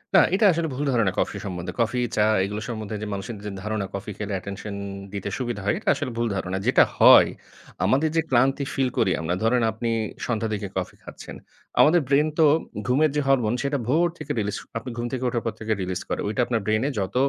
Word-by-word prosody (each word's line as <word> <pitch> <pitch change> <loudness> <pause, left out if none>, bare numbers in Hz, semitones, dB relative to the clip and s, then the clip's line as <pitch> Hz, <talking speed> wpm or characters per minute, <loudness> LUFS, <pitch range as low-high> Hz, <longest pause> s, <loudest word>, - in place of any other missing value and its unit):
না, - - +9 0.2
এটা 210 +1 +3
আসলে 165 0 -1
ভুল 140 - -2
ধারণা 115 -6 +2
কফি - - -1
সম্বন্ধে। 90 -2 -4
কফি, 120 +2 0 0.2
চা 105 - +3 0.2
এগুলো 105 +2 -4
সম্বন্ধে 110 -2 -4
যে, 105 - -4
মানুষের 100 +3 -5
যে, 105 - -4
ধারণা, 110 -2 -2
কফি 100 +2 -5
খেলে 105 -1 -4
অ্যাটেনশন 100 +2 -6 0.4
দিতে 100 0 -4
সুবিধা 120 -5 -3
হয়, 105 - +2
এটা - - -2
আসলে 125 - -4
ভুল 120 - +1
ধারণা। 95 0 -2
যেটা - - +6 0.2
হয়, - - +8 0.6
আমাদের 145 +4 +2
যে, 165 - +4
ক্লান্তি 135 +3 +3
ফিল 135 -2 +1
করি 100 -5 +3
আমরা, 80 +2 -1
ধরেন 120 +2 +3
আপনি 115 +2 -3 0.4
সন্ধ্যার 115 -2 -1
দিকে 100 -1 -3
কফি 90 - -3
খাচ্ছেন। - - -10 0.4
আমাদের 165 +2 +6
ব্রেইন 140 +3 +3
তো 160 - +7 0.4
ঘুমের 145 +5 +3
যে, 150 - +2
হরমোন, 125 -5 +3
সেটা 140 +1 0
ভোর 160 +7 +3
থেকে 150 -1 -6
রিলিজ 105 -1 -2
করে, - - -20
আপনি 125 +3 -8
ঘুম 120 - -2
থেকে 130 -1 -3
উঠার 120 -1 -2
পর 115 - -1
থেকে 110 0 -1
রিলিজ 90 0 -3
করে। - - -2
ওইটা 110 +4 0
আপনার 115 -2 -1
ব্রেইনে 110 +6 +1
যত 95 +3 -3
115 Hz, 215 wpm, -24 LUFS, 100-130 Hz, 0.6 s, না